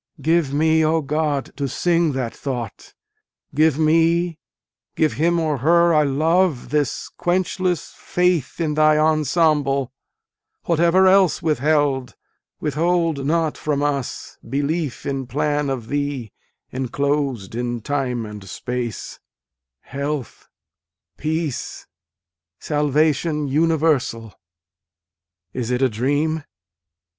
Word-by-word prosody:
Give 160 -3 +1
me, 160 +2 +3
O 160 +1 +2
God, 150 -1 -1
to 140 -1 -1
sing 170 +1 +1
that 130 -3 -3
thought, 120 -6 -6 0.6
Give 155 0 +3
me, 165 +1 +2 0.6
give 155 -5 +2
him 170 +7 +1
or 155 -4 0
her 170 +5 +4
I 155 - +5
love 155 +1 +1
this 145 -2 -1
quenchless 180 -1 -1
faith, 180 -6 0
In 160 -3 0
Thy 155 0 +4
ensemble, 150 -3 +2 0.7
whatever 170 +3 +3
else 190 -3 +4
withheld 145 -4 +1 0.4
withhold 160 -1 0
not 160 -1 0
from 145 -2 -1
us 140 -3 -3
Belief 145 +2 -2
in 135 -2 -3
plan 145 +1 0
of 125 -4 -4
Thee 140 -6 -3 0.4
enclosed 135 -4 -1
in 120 0 -2
Time 125 -3 -2
and 105 -1 -9
Space, 125 0 -5 0.6
Health, 140 -1 -5 0.7
peace, 160 -2 -3 0.7
salvation 150 - +1
universal. 145 - +1 1.2
Is 125 -2 -3
it 125 +1 +1
a 130 - +4
dream 145 +7 0
150 Hz, 105 wpm, -21 LUFS, 135-160 Hz, 1.2 s, I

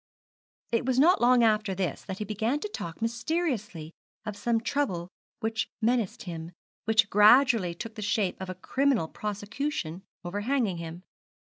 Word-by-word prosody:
It 230 0 +1
was 255 0 0
not 330 +5 +5
long 245 0 +5
after 215 -3 +2
this 185 -5 -2
that 190 -1 -5
he 210 - -3
began 220 +7 -1
to - - -2
talk 170 - -6
mysteriously 230 - -2 0.3
of 210 -1 -4
some 230 +3 +1
trouble 225 -9 -1 0.3
which 220 0 -1
menaced 230 -3 0
him, 165 -1 -7 0.3
which 220 0 +3
gradually 215 -3 +6
took 225 +5 -7
the 215 - -7
shape 200 -2 0
of 190 - -5
a 185 - -4
criminal 260 - +1
prosecution 210 - -4 0.2
overhanging 205 +1 0
him. 170 +1 -7
215 Hz, 150 wpm, -28 LUFS, 185-245 Hz, 0.3 s, gradually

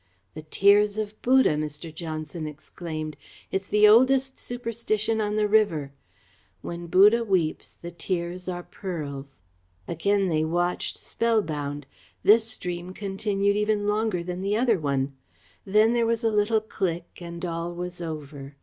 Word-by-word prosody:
"The 155 - -7
tears 200 +6 +4
of 215 -1 -3
Buddha," 260 -3 +5
Mr. 150 +1 -5
Johnson 155 0 -5
exclaimed. 155 0 -6 0.4
"It's 190 0 -2
the 210 0 +5
oldest 260 +4 +4
superstition 230 -2 -2
on 210 0 -1
the 210 -1 +2
river. 185 -10 +2 0.7
'When 170 0 -6
Buddha 210 +7 +6
weeps, 185 -7 -1
the 170 - -7
tears 175 +1 -3
are 175 -1 -4
pearls.'" 140 - -7 0.5
Again 195 +4 +1
they 155 -3 +1
watched, 175 +2 -1
spellbound. 150 -11 -1 0.4
This 220 +2 +6
stream 180 -4 -5
continued 200 0 0
even 210 0 +1
longer 210 -4 0
than 180 +1 -5
the 200 +2 0
other 230 -5 +2
one. 140 -2 -1 0.5
Then 215 +4 +4
there 235 -1 +2
was 230 +1 0
a 225 - +2
little 215 +1 +2
click 175 -5 -4
and 170 +1 -6
all 170 0 -3
was 175 0 -6
over. 145 -3 -7
185 Hz, 140 wpm, -26 LUFS, 160-215 Hz, 0.7 s, Buddha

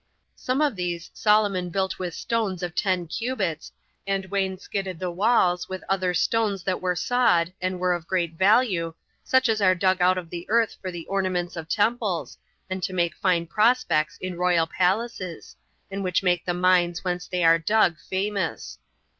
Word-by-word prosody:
Some 255 +3 -1
of 290 -6 +2
these 175 -2 -4
Solomon 205 -4 +2
built 190 +2 -2
with 180 -2 -4
stones 205 -6 -2
of 175 -1 -3
ten 185 -2 0
cubits, 195 - -3 0.4
and 195 -1 -1
wainscoted 190 -1 -2
the 180 +1 -3
walls 180 -2 +2
with 185 0 -6
other 185 -2 0
stones 210 -2 +1
that 185 0 -2
were 180 -1 0
sawed, 175 -5 +2
and 185 0 -2
were 180 0 +2
of 170 -2 -5
great 175 -3 -1
value, 190 -3 +2 0.3
such 260 -1 +3
as 220 -2 +1
are 185 -1 +4
dug 185 0 +1
out 185 +1 +4
of 170 -3 -6
the 175 0 -6
earth 225 0 +2
for 185 - -4
the 175 -2 -7
ornaments 185 -2 -1
of 165 -1 -7
temples, 205 - 0 0.3
and 185 0 -4
to 185 +1 -3
make 170 -2 0
fine 175 -3 +1
prospects 210 -5 +2
in 185 -2 -5
royal 180 -2 +3
palaces, 185 0 -2 0.4
and 195 0 -3
which 180 0 0
make 175 -2 +1
the 175 - 0
mines 175 -1 +2
whence 180 -1 -3
they 180 -1 -1
are 165 0 +6
dug 195 0 +3
famous. 190 - -3
185 Hz, 175 wpm, -25 LUFS, 175-200 Hz, 0.4 s, are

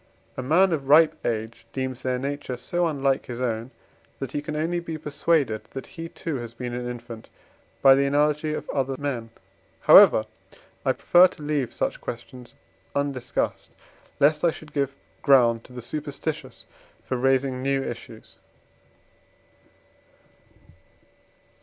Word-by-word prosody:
A - - -4
man 175 +8 +4
of 140 -4 -3
ripe 155 +3 +6
age 115 0 -3
deems 130 -1 -3
their 130 -1 -1
nature 140 -1 -4
so 175 +7 -1
unlike 135 -3 0
his 120 -1 -6
own, 115 -1 -2 0.5
that 135 - -5
he 145 - -2
can 150 +1 -5
only 165 +3 0
be 165 -2 -5
persuaded 145 -6 0
that 135 - -6
he 165 -2 -7
too 160 -4 -4
has 120 -1 -7
been 125 0 -5
an 125 0 -4
infant 115 -2 -9 0.5
by 135 -1 +9
the 140 +1 +2
analogy 150 +2 +1
of - - -6
other 135 -1 -1
men. 130 -5 -3 0.5
However, 110 - +8 0.6
I - - +2
prefer 180 +1 +6
to 165 -4 -13
leave 145 -4 -1
such - - -2
questions 125 +1 -8 0.4
undiscussed, 140 -2 -2 0.4
lest 150 +1 +3
I 170 - +5
should 155 -1 -9
give 140 -2 -1 0.3
ground 120 -5 +4
to - - -16
the 125 -1 -8
superstitious 150 +3 -5 0.4
for 130 - -2
raising 130 0 +1
new 135 0 0
issues. - - -9
135 Hz, 140 wpm, -25 LUFS, 125-150 Hz, 0.6 s, by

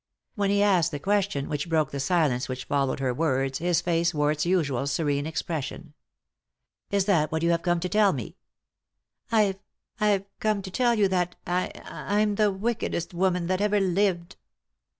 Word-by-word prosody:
When 200 -1 0
he 200 0 +3
asked 180 -5 +3
the 145 - -4
question 195 -4 0
which 150 +2 -3
broke 155 -3 +1
the 140 - -4
silence 145 -6 +1
which 130 0 -5
followed 140 -2 0
her 130 -2 0
words 135 -2 0
his 175 0 +1
face 170 -1 +1
wore 150 0 +2
its 150 +2 -1
usual 145 -8 +1
serene 145 0 0
expression. 160 -3 -4 0.5
" - - -60 0.2
Is 200 -1 +1
that 170 -7 +2
what 160 +1 -1
you 170 - +3
have 170 0 +1
come 175 -1 +1
to 180 - -1
tell 210 +1 +3
me? - - -6 0.5
" - - -40
"I've 205 -4 +2 0.3
— - - -38
I've 205 -2 +2
come 215 -2 0
to 190 - -7
tell 240 +2 +2
you 205 -3 +3
that 180 -1 0
I— 180 +1 0 0.2
I'm 210 +1 0
the 210 0 +2
wickedest 195 -4 -2
woman 180 0 +1
that 185 +2 0
ever 210 0 +2
lived." 185 -2 0
175 Hz, 190 wpm, -26 LUFS, 150-200 Hz, 0.5 s, he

